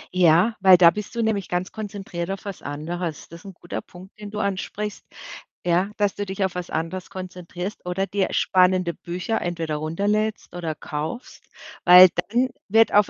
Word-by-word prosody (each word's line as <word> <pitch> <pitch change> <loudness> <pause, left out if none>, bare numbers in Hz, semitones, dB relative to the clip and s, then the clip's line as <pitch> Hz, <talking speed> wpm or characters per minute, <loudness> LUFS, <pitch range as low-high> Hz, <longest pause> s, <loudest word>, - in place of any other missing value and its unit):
Ja, 180 +6 +4
weil 190 -2 +8
da 170 -1 +7
bist 210 +4 -7
du 230 - 0
nämlich 205 -4 -1
ganz 180 +1 -2
konzentriert 195 -5 -6
auf 195 +1 -5
was 200 -3 -6
anderes. 155 +3 -5
Das 170 +1 -11
ist - - -22
'n 190 - -10
guter 175 - -6
Punkt, 185 +2 -14
den 205 -1 -7
du 210 - -7
ansprichst, 200 +1 -3 0.6
ja, 180 +3 +2
dass 205 -2 +1
du 205 - -4
dich 190 0 -1
auf 190 - -3
was 180 -1 -5
anderes 165 +3 -4
konzentrierst 185 0 -7
oder 190 +2 -1
dir 195 -1 0
spannende 185 -2 +2
Bücher 180 +6 -3
entweder 165 -3 -2
runterlädst 205 +6 -1
oder 165 -3 -3
kaufst, 155 +14 -6 0.4
weil 180 0 +10 0.2
dann 250 +3 +2 0.2
wird 225 +3 +4
auf 205 -1 +5
185 Hz, 180 wpm, -23 LUFS, 175-205 Hz, 0.6 s, weil